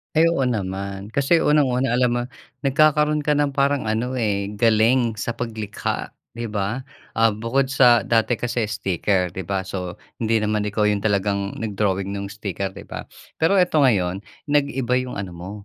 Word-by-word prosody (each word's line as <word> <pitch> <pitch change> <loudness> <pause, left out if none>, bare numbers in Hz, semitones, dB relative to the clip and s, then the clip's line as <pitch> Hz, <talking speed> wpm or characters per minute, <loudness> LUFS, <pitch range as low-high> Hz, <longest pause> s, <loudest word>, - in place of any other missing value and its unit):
Ay, 160 +2 +5
oo 165 -5 +1
naman, 100 -4 -3
kasi 140 +8 +2
unang-una, 135 -5 +2
alam 125 -1 +2
mo 120 0 0 0.5
nagkakaroon 150 +1 +3
ka 150 - +1
ng 145 -1 +1
parang 140 -3 +1
ano, 110 +3 -1
eh, 100 -3 -1
galing 115 +1 +3
sa 110 +2 -3
paglikha, 110 -3 -4 0.2
'di 115 -2 -5
ba? 105 +5 -2 0.3
Ah, 115 0 +4
bukod 115 +6 -1
sa 120 -4 +5
dati 115 +2 +2
kasi 120 -2 -2
sticker, 95 -2 0
'di 90 0 -7
ba, 95 -1 -1
so 90 -1 -5 0.2
hindi 115 0 +1
naman 105 0 0
ikaw 105 +1 0
yung 105 -1 +2
talagang 100 -1 0
nag-drawing 100 -3 -1
nung 100 0 -4
sticker, 100 -1 -5
'di - - -9
ba. - - -8 0.3
Pero 165 +5 +3
eto, 180 -4 +3
ngayon 95 -9 +2 0.3
nag-iba 135 -4 +1
yung 125 -1 -5
ano 95 -2 -5
mo 85 +3 -8
110 Hz, 170 wpm, -22 LUFS, 100-130 Hz, 0.5 s, Ay